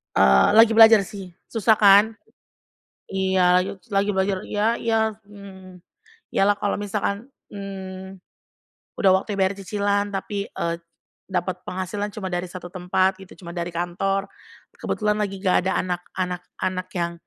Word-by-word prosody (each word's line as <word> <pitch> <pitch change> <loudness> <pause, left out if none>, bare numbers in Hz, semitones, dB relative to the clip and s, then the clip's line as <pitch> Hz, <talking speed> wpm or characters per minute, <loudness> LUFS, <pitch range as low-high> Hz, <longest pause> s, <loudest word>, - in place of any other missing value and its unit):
Eee, 65 -1 +5
lagi 225 0 +7
belajar 225 -1 +8
sih, 190 -3 -10 0.2
susah 225 -1 +3
kan? 200 -1 +7 1.1
Iya, 190 -1 +3
layu 185 - -3
selagi 200 +1 0
belajar 190 0 0
iya 210 +2 +1
iya, 225 -1 0 0.3
mhm 210 - -15
mhm, 190 -2 -12 0.6
iya - - +1
lah 205 - +4
kalau 205 - 0
misalkan, 205 +1 -3 0.2
mmm, 190 -1 -8 0.8
udah 195 - +5
waktu 205 +2 -5
bayar 190 +1 +2
cicilan 200 +1 -1
tapi, 200 +1 -3
eee, 170 0 -2 0.5
dapat 185 -1 -3
penghasilan 200 +3 -4
cuma 190 -3 -5
dari 175 0 -2
1 175 0 -9
tempat 185 +1 0
gitu, 190 -1 -13
cuma 170 - -9
dari 170 0 -4
kantor, 195 +3 -2 0.5
kebetulan 210 -1 -1
lagi 195 -2 -3
nggak 185 -2 +3
ada 190 - +1
anak 180 -1 -3
anak 180 -1 -3 0.2
anak 185 -1 -2
yang 170 -1 -2
190 Hz, 150 wpm, -23 LUFS, 185-205 Hz, 1.1 s, belajar